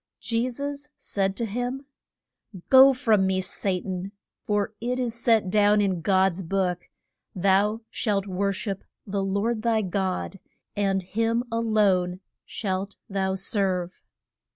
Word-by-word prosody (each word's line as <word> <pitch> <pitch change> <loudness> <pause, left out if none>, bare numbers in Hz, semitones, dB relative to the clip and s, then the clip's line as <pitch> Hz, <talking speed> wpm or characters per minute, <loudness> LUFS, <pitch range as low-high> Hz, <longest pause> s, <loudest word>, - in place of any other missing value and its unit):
Je 235 +2 -1
sus 285 +3 -5
said 195 -1 -1
to 235 - +1
him, 245 +5 -3 0.8
Go 265 +1 +9
from 225 -7 +2
me, 190 0 +1
Sa 185 0 -2
tan, 185 +1 -5 0.4
for 205 0 0
it 245 +2 -1
is 245 -3 -1
set 225 -5 +2
down 210 0 +4
in 190 -4 0
God's 190 +1 +2
book, 180 0 -2 0.5
Thou 200 +4 +2
shalt 200 -4 0
wor 200 +1 -1
ship 195 0 -4 0.2
the 200 0 -2
Lord 205 +4 0
thy 225 -1 +1
God, 190 +1 -2 0.4
and 195 -2 0
him 230 +5 0
a 230 - 0
lone 195 -5 +2 0.3
shalt 195 -1 -3 0.2
thou 190 -1 0
serve. 190 -2 -1
200 Hz, 135 wpm, -25 LUFS, 190-230 Hz, 0.8 s, Go